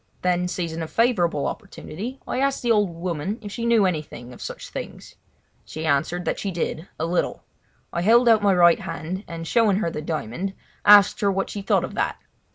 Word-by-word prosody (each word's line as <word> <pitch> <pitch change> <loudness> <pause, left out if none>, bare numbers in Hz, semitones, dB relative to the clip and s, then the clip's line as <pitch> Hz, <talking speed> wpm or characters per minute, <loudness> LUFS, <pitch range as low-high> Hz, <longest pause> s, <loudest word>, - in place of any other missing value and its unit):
Then, 180 0 +1
seizing 170 -2 -3
a 160 - -3
favourable 175 - +1
opportunity, 230 - -6
I - - -2
asked 275 -1 0
the 240 - +2
old 210 -3 +3
woman 170 +3 -3
if 205 - -7
she 235 +2 -3
knew 230 -4 +4
anything 150 -8 -4
of - - -13
such - - -7
things. - - -8 0.5
She 160 +1 -6
answered 160 +4 0
that - - -1
she 200 - -2
did, 170 -1 -3
a 160 - 0
little. 175 +1 -1 0.5
I 170 - -1
held 235 +6 +5
out 225 -2 +6
my 200 -2 +3
right 175 -1 +6
hand, 170 +4 -5
and, 165 -1 -6
showing 215 -1 +3
her 170 -5 -1
the 150 - -5
diamond, 160 - -4 0.3
asked 205 +2 +7
her 200 -1 +3
what 195 0 -2
she 205 - -5
thought 195 - +2
of - - -5
that. - - -1
180 Hz, 200 wpm, -23 LUFS, 165-210 Hz, 0.5 s, asked